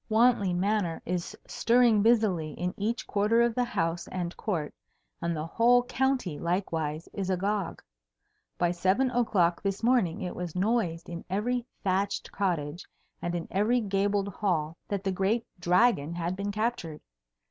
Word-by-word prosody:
Wantley 220 -3 +4
Manor 180 -1 0
is 180 +4 -3
stirring 235 -3 +3
busily 200 -9 +2
in 180 +1 -3
each 225 +4 -2
quarter 215 +3 +3
of 235 -1 +2
the 250 - +1
house 170 -8 -2
and 175 -1 -4
court, 165 -8 -3 0.5
and 170 0 -1
the 155 - -3
whole 240 +8 +4
county 250 - 0
likewise 165 -3 -2
is 195 -2 -3
agog. 195 0 -1 0.7
By 175 -1 +2
seven 190 +9 +2
o'clock 195 -9 +2
this 195 +2 -2
morning 230 -9 +2
it 180 - -4
was 175 -2 -5
noised 180 -4 0
in 170 0 -6
every 235 +6 -1 0.2
thatched 195 +1 0
cottage 170 -4 -2 0.3
and 175 0 -2
in 170 - -3
every 215 +6 +2
gabled 200 -1 0
hall 170 -6 -1
that 200 -2 -2
the 195 - 0
great 200 +5 0
Dragon 175 -3 +3
had 175 +1 -2
been 200 +1 -3
captured. 210 -8 -2
195 Hz, 150 wpm, -28 LUFS, 175-225 Hz, 0.7 s, Wantley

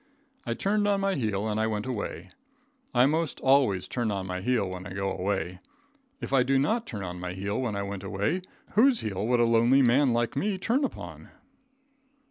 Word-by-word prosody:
I - - -1
turned 205 +1 +1
on 200 -1 +2
my 195 0 +1
heel 110 - -1
and 110 0 -1
I 110 - +1
went 105 0 -2
away. 125 -5 -5 0.6
I 125 +1 +4
most 155 +2 0
always 130 -9 +3
turn 120 -3 -2
on 100 -2 -2
my 90 0 -4
heel 120 -2 +1
when 90 0 -6
I 90 - -8
go 95 0 -2
away. 95 -1 -2 0.6
If - - -5
I 135 - +5
did 135 +1 +2
not 225 - 0
turn 105 -4 -5
on 90 -1 -6
my 90 0 -4
own - - -10
heel 100 +4 -2
when 115 -5 -2
I 100 - -2
went 100 -1 -5
away, 105 - -1 0.3
whose 245 +3 +4
heel 105 0 -3
would 120 0 +2
a 120 - +5
lonely 115 +4 +4
man 130 +2 +4
like 120 0 0
me 195 +7 0
turn 235 +9 0
upon? 275 - -6
115 Hz, 210 wpm, -27 LUFS, 100-140 Hz, 0.6 s, I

